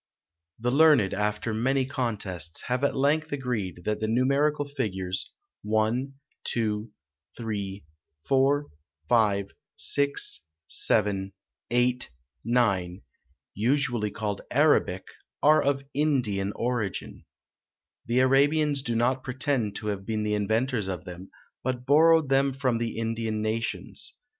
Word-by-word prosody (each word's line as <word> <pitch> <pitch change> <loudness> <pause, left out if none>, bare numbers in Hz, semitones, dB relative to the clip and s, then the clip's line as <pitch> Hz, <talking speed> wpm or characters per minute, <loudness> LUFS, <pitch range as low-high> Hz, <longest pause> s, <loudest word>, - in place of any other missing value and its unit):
The 125 +2 -1
learned, 145 -8 +5
after 105 +1 -1
many 130 +4 +1
contests, 105 - -3
have 125 +2 -1
at 140 - +2
length 150 +3 +1
agreed 115 -11 -3
that 105 0 -1
the 110 - -1
numerical 140 +5 +2
figures 95 -10 -3 0.3
1, 110 +6 0 0.3
2, 110 -1 -1 0.5
3, 100 -5 -4 0.4
4, 140 +2 +3 0.4
5, 100 -3 +2 0.3
6, 140 0 0 0.3
7, 100 -3 0 0.4
8, 125 +1 +1 0.3
9, 100 -7 +1 0.5
usually 120 -1 +1
called 105 -2 -3
Arabic, 135 -10 +3 0.4
are 155 +1 +6
of 140 -1 0
Indian 125 -10 +1
origin. 120 -5 -3 0.8
The 120 +2 +3
Arabians 140 +2 +3
do 120 -3 -2
not 125 +3 +1
pretend 130 -5 -1
to 105 - -5
have 100 -2 -3
been 110 -1 -1
the 105 0 0
inventors 110 +2 0
of 90 -1 -4
them, 90 +1 -9 0.3
but 125 -1 -2
borrowed 160 +1 +5
them 135 0 +3
from 130 -3 0
the 115 -1 -3
Indian 115 -1 -2
nations. 115 - -3
120 Hz, 120 wpm, -27 LUFS, 105-135 Hz, 0.8 s, are